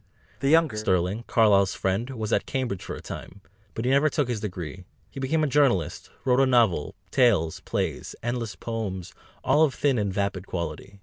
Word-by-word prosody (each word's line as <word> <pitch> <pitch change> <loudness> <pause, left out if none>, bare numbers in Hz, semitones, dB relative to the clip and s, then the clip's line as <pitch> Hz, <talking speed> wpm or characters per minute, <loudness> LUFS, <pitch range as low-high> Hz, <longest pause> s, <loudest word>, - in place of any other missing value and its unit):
The 135 - +1
younger 160 -7 +4
Sterling, 95 +2 0
Carlyle's 100 -4 +4
friend, 95 +6 -1
was 110 -5 -3
at - - +1
Cambridge 125 -8 -2
for - - -5
a - - -9
time, 95 - -8 0.4
but 115 - -3
never 140 +4 +4
took 145 -4 0
his 120 -3 -1
degree; 90 -4 -6 0.3
he - - -8
became 155 +4 +1
a - - +2
journalist, 120 - +1 0.2
wrote 125 -1 +3
a 135 - +5
novel, 115 - +2 0.2
tales, 105 - +3
plays, - - -3
endless 120 -4 -2
poems 100 -5 -5 0.3
all 145 +4 +3
of 150 -5 +3
thin 135 -5 +2
and 100 -2 0
vapid 100 -1 -2
quality. 85 +3 -5
110 Hz, 180 wpm, -26 LUFS, 95-130 Hz, 0.4 s, a